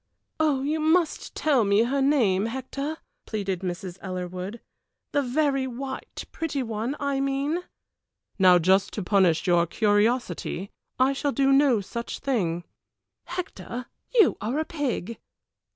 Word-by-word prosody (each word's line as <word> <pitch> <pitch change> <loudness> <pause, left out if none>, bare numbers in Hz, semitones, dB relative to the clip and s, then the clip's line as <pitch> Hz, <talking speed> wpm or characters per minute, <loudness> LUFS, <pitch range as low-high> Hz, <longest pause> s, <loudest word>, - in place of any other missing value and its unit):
"You 300 0 +1
must 320 +1 +1
tell 280 -7 +3
me 200 +2 +4
her 270 +4 0
name, 225 -8 +3
Hector," 275 +5 -4 0.3
pleaded 195 -4 -2
Mrs. 180 0 -5
Ellerwood; 185 +3 -5 0.5
"the 285 - +2
very 275 0 +1
white, 265 +2 -6
pretty 295 -5 -2
one 225 +4 -3
I 280 -1 0
mean." 275 +4 0 0.8
"Now 185 -1 +7
just 190 +3 +3
to 205 - -3
punish 180 -4 +3
your 175 -2 +3
curiosity 205 -2 0 0.3
I 260 +2 +3
shall 285 +1 -1
do 275 0 +2
no 270 -5 +4
such 235 +4 -5
thing." 175 -11 -1 0.6
"Hector, 340 -8 -5 0.3
you 430 -8 +5
are 230 +7 -1
a 315 - 0
pig." 255 - -3
245 Hz, 130 wpm, -26 LUFS, 195-280 Hz, 0.8 s, Now